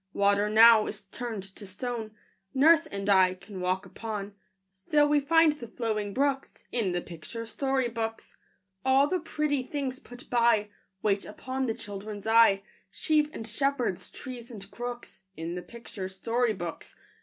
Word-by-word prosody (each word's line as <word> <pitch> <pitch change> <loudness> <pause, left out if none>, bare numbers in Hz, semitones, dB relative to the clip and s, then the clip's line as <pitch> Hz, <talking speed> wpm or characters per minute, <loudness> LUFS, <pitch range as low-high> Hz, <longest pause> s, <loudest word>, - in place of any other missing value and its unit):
Water 200 +1 +3
now 220 0 +7
is 210 0 -6
turned 220 0 -5
to 195 +1 -11
stone 225 +3 -4 0.5
Nurse 315 +4 +6
and 200 0 -5
I 190 -2 +5
can 185 0 -9
walk 185 +2 0
upon; 205 +1 -6 0.4
Still 295 +10 +2
we 295 0 +4
find 320 +2 +4
the 255 -6 -9
flowing 215 -3 -2
brooks 275 +3 -1
In 220 -6 0
the 175 0 -1
picture 180 +8 -8
story 265 +2 0
books. 225 -1 -5 0.5
All 265 +1 +5
the 365 +4 0
pretty 300 -3 -1
things 260 -1 -4
put 245 +1 -13
by, 230 -3 +3 0.3
Wait 200 -2 +2
upon 260 0 -4
the 225 - -1
children's 205 -2 -7
eye, 220 -3 +5 0.3
Sheep 310 -4 +1
and 225 - -7
shepherds, 245 -3 -1
trees 250 -2 -8
and 200 -4 -10
crooks, 240 +1 -7 0.2
In 165 +2 -4
the 180 - -4
picture 215 -4 -8
story 230 +5 0
books. 175 -4 -7
225 Hz, 155 wpm, -28 LUFS, 200-260 Hz, 0.5 s, now